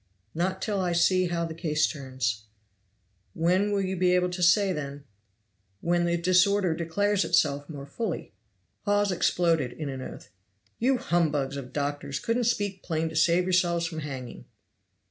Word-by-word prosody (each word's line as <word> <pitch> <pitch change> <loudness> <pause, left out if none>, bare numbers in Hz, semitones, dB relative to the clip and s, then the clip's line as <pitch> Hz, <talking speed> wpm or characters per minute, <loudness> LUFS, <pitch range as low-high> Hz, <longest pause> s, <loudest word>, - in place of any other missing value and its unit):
"Not 185 +3 -1
till 205 -3 -1
I 180 -2 0
see 185 +2 +3
how 170 -1 -1
the 165 - -5
case 155 -2 +1
turns." 130 -7 -3 0.9
"When 185 +5 +2
will 200 -1 +1
you 190 0 -2
be 180 0 +3
able 180 0 +1
to 180 0 -5
say 185 +3 +4
then?" 140 -2 -6 0.8
"When 175 +4 +1
the 170 0 +1
disorder 185 +1 +3
declares 195 +5 0
itself 145 0 +1
more 140 -3 -7
fully." 180 +6 -4 0.5
Hawes 205 -1 +2
exploded 165 -7 +1
in 150 -3 -5
an 135 -1 -5
oath. 105 - -9 0.5
"You 255 +3 +3
humbugs 150 - 0
of 135 -3 -7
doctors 145 -1 -3
couldn't 230 +6 0
speak 205 -4 -1
plain 160 -1 -2
to 160 - -9
save 170 +2 +4
yourselves 175 -2 +1
from 165 -1 -4
hanging." 130 -5 -7
170 Hz, 160 wpm, -27 LUFS, 145-185 Hz, 0.9 s, say